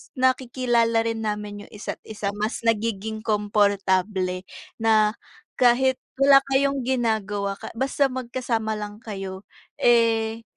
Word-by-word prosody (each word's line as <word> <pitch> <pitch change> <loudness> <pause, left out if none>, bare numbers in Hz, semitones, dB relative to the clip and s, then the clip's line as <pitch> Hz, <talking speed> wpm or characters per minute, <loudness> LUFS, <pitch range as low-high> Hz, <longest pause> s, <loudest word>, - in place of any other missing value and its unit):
nakikilala 245 -3 +2
rin 225 -1 -2
namin 210 -1 -4
yung - - -23
isa't 210 - -6
isa, 210 -2 -3
mas 220 +2 -2
nagiging 220 -1 -1
komportable, 200 -3 0 0.3
na 220 -1 +4 0.5
kahit 255 +1 +4 0.2
wala 275 0 +7
kayong 275 +1 +2
ginagawa 210 -5 -1
ka 220 - -8
basta 275 +3 +1
magkasama 240 -4 -3
lang 210 +1 -8
kayo, 195 -3 -6 0.3
eh 230 -1 +2
220 Hz, 115 wpm, -24 LUFS, 205-240 Hz, 0.5 s, wala